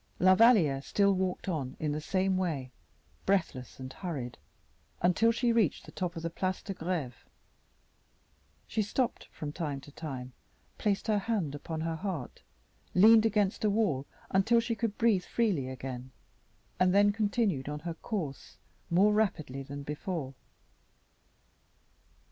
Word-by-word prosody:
La 185 +1 +6
Valliere 185 - +5
still 200 +6 +2
walked 185 0 -2
on 145 -8 -3
in 150 -2 -1
the 150 +1 -2
same 190 +3 +1
way, 155 -9 -2 0.6
breathless 150 -12 0
and 130 0 -7
hurried, 145 -10 -5 0.6
until 185 +6 +4
she 235 +1 +1
reached 220 -9 +1
the - - -11
top 180 -1 -3
of 165 - -6
the 165 - -1
Place 185 +2 -2
de 195 - -4
Greve. 165 - -3 1.4
She 220 - -1
stopped 230 +4 -1
from 150 -1 -5
time 150 -5 -3
to 145 - -13
time, 130 -5 -6 0.5
placed 200 -2 0
her 215 -2 +2
hand 195 -8 -1
upon 160 +2 -5
her 165 0 -2
heart, 170 -8 -5 0.5
leaned 220 +4 +7
against 205 -2 +1
a 215 - +4
wall 200 -11 +1 0.2
until 220 +5 +4
she 230 0 -1
could 225 -2 -2
breathe 220 -6 +3
freely 195 - 0
again, 130 -1 -6 0.7
and 185 +1 +4
then 205 0 +6
continued 205 - 0
on 150 0 -4
her 170 +1 -4
course 165 - -5 0.3
more 195 +5 +4
rapidly 155 -11 0
than 140 +1 -7
before. 150 -1 -4
180 Hz, 145 wpm, -30 LUFS, 145-205 Hz, 1.4 s, leaned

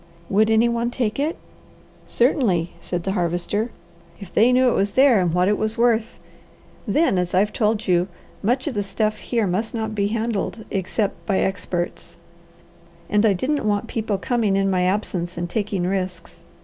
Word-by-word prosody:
"Would 215 +2 +4
any 225 +1 +4
one 235 0 0
take 240 -1 -2
it?" 305 +4 -1 0.7
"Certainly!" 225 - +1
said 175 -1 -4
the 195 - -1
Harvester. 180 +4 -1 0.5
"If 195 -4 -11
they 235 +3 +5
knew 255 +1 +4
it - - +1
was 200 +1 0
there, 260 -5 +5
and 180 -2 +1
what 180 +2 +2
it 205 0 +1
is 215 +1 -1
worth. 230 -1 +1 0.7
Then, 210 - +2
as 180 0 -1
I've 205 +3 +2
told 215 -1 0
you, 180 0 +3 0.3
much 250 +5 +1
of 295 - -2
the 205 - -1
stuff 215 +2 -1
here 230 -3 -1
must 205 +6 -2
not 220 -1 -2
be 200 -1 0
handled 220 0 -2
except 195 +2 -2
by 195 -3 +2
experts, 180 -3 -3 0.9
and 210 +2 +4
I 205 - +4
didn't 275 +10 -1
want 205 -1 +1
people 220 -3 -2
coming 215 -1 0
in 195 0 +2
my 180 -1 +2
absence 185 -3 -2
and 175 0 -2
taking 200 -1 -2
risks. 185 -2 -4
210 Hz, 175 wpm, -22 LUFS, 185-230 Hz, 0.9 s, they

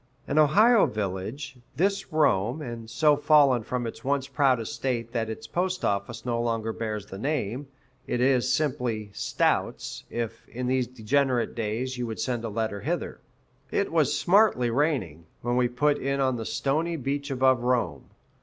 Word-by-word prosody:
An 150 - +2
Ohio 210 +10 +5
village, 105 +7 -4 0.2
this 195 +3 0
Rome, 135 -5 +2
and 120 -6 -7
so 145 +5 +4
fallen 145 -4 +4
from 120 +2 -3
its 115 - -7
once 135 0 0
proud 135 -5 +2
estate 115 +1 -3
that 115 -2 -2
its 110 - -6
postoffice 120 - -2
no 120 -1 0
longer 115 -1 -1
bears 110 -3 -4
the 95 -1 -9
name 135 -1 -2 0.4
it 120 - -1
is 125 -1 +3
simply 120 -8 -1
"Stout's," - - -1
if, 115 -1 -5
in 125 +1 -4
these 130 -1 +1
degenerate 125 +1 0
days, 120 +3 -3
you 120 - -2
would 110 -1 -5
send 120 0 -2
a 115 - -3
letter 110 -1 -2
hither. - - -3 0.5
It - - 0
was - - +2
smartly 180 - +3
raining, 115 - -1 0.2
when 120 +1 0
we 125 0 +3
put 145 +4 +1
in 140 +1 -1
on 130 -2 +2
the 115 - -5
stony 160 +5 0
beach 140 0 -3
above 130 -1 +3
Rome. 120 - 0
125 Hz, 165 wpm, -26 LUFS, 115-140 Hz, 0.5 s, Ohio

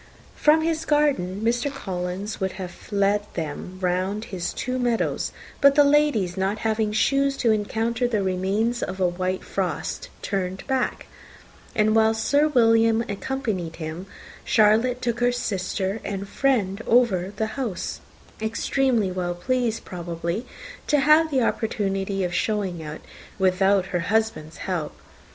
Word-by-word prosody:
From 310 +1 +4
his 325 0 0
garden, 280 - +1
Mr. 240 +4 +1
Collins 190 -3 -4
would 190 -1 -1
have 185 0 -9
led 200 0 +2
them 165 +3 -5
round 185 +4 -1
his 175 -2 -4
two 255 +1 -3
meadows; 240 -2 0 0.3
but 280 -1 +6
the 290 - +7
ladies, 280 -11 +3
not 195 +2 0
having 220 -1 +1
shoes 275 +5 +2
to 230 - +2
encounter 225 +3 0
the 215 -4 0
remains 195 +6 0
of 190 +1 -4
a 185 - +3
white 185 +1 -2
frost, 185 -4 -3
turned 190 -1 -3
back; 265 -2 -1 0.7
and 215 0 +3
while 220 0 +4
Sir 285 +7 +3
William 225 -4 +4
accompanied 200 - -3
him, 165 +3 -6 0.4
Charlotte 225 +3 +3
took 240 -1 -1
her 245 0 +3
sister 195 -3 -2
and 200 0 -4
friend 220 -6 0
over 200 -6 +3
the 220 - 0
house, 235 -8 -4 0.4
extremely 230 -1 +1
well 180 -1 -2
pleased, 240 +3 -1
probably, 170 +5 -4 0.4
to 295 -2 +3
have 305 +3 +5
the 265 -4 +2
opportunity 195 -4 -1
of 175 -1 -2
showing 200 -5 -1
it 155 0 -7 0.4
without 190 0 +3
her 175 - +2
husband's 205 -4 -1
help. 170 - -3
210 Hz, 140 wpm, -24 LUFS, 185-245 Hz, 0.7 s, the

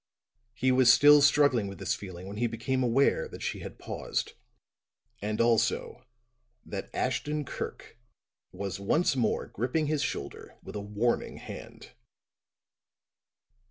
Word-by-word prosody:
He 130 +2 +2
was 130 -1 +6
still 145 +2 +7
struggling 140 -6 +4
with 100 - -8
this - - -1
feeling 95 -2 -8
when 100 +1 -7
he 120 +2 +1
became 130 +3 -2
aware 125 +3 +2
that - - -9
she - - -3
had - - -8
paused; - - -4 0.9
and, 105 +1 -2
also, 115 -1 +1 0.6
that - - -6
Ashton 150 0 -1
Kirk 120 - -7 0.5
was 100 +1 -5
once 135 - +2
more 120 -4 0
gripping 130 +8 -1
his 150 -1 0
shoulder 120 - -5
with 95 - -9
a 105 - -3
warning 105 +4 -1
hand. - - -10
120 Hz, 130 wpm, -29 LUFS, 105-140 Hz, 0.9 s, still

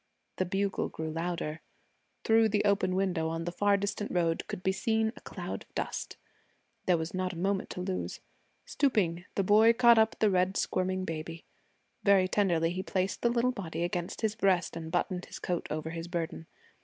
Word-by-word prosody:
The 185 - +1
bugle 195 +2 -1
grew 160 0 -5
louder. 165 -1 -3 0.6
Through 225 0 +4
the 210 0 +1
open 195 -2 +2
window 180 -4 0
on 165 +1 -3
the 175 - -2
far 205 +3 +3
distant 200 +1 -3
road 165 -2 0
could 180 - -6
be 190 - +3
seen 220 +3 0
a - - -13
cloud - - -6
of - - -18
dust. - - -3 0.7
There 180 -2 +4
was 160 +1 -4
not 185 0 -1
a - - -8
moment 195 +2 -1
to 180 - -5
lose. 185 0 -3 0.5
Stooping, 180 - +1
the 195 - +2
boy 215 +4 +6
caught 235 -1 +6
up 220 0 +2
the 215 -2 +3
red 185 +1 +2
squirming 185 0 0
baby. 165 0 -6 0.6
Very 195 -2 +5
tenderly 175 -4 +2
he 185 +1 -2
placed 190 0 -2
the 235 - +3
little 240 +1 +2
body 170 -8 -4
against 175 0 -3
his 220 -2 +1
breast 195 -7 +1
and 160 -1 -6
buttoned 180 +1 -1
his - - -9
coat 175 -1 -2
over 155 +1 -3
his 165 0 -5
burden. 170 -1 -4
185 Hz, 190 wpm, -30 LUFS, 170-205 Hz, 0.7 s, boy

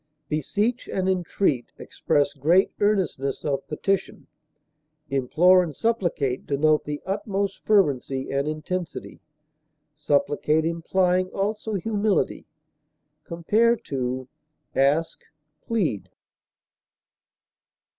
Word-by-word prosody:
Beseech 205 - -1
and 190 -1 -1
entreat 180 -7 0
express 145 -1 0
great 165 +7 +3
earnestness 185 -10 0
of 140 -2 -2
petition; 195 +5 -2 0.9
implore 165 +8 +4
and 160 -5 -4
supplicate 175 - -1
denote 150 +2 +2
the 150 0 -5
utmost 195 0 -2
fervency 140 -10 +1
and 140 +1 0
intensity, 160 +3 -5 0.7
supplicate 150 +1 +1
implying 180 +2 +1
also 210 +3 -3
humility. 210 +1 0 0.8
Compare 215 +8 +2 1.0
ASK; 145 +5 +1 0.5
PLEAD. 185 - -1
170 Hz, 80 wpm, -24 LUFS, 145-195 Hz, 1.0 s, implore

